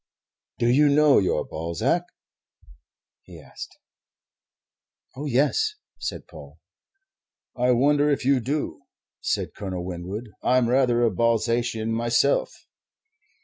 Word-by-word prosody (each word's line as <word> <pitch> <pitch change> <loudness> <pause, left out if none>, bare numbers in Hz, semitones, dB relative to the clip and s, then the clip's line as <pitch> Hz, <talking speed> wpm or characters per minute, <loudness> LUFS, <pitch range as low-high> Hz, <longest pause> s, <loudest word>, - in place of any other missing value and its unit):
"Do 120 - +1
you 145 +5 +4
know 145 0 +5
your 95 - 0
Balzac?" 85 - -1 1.2
he - - -14
asked. - - -11 1.4
"Oh, 145 +3 -5
yes," 150 - +1 0.2
said - - -5
Paul. - - -13 1.0
"I 125 0 +1
wonder 145 +4 +3
if 140 -3 0
you 135 -1 +3
do," 140 +5 -3 0.4
said - - -2
Colonel 95 -3 -5
Winwood. 95 +6 -6
"I'm 125 -2 +2
rather 125 -2 +2
a 115 - +3
Balzacian 115 +1 0
myself." 120 +4 +1
120 Hz, 105 wpm, -24 LUFS, 110-140 Hz, 1.4 s, know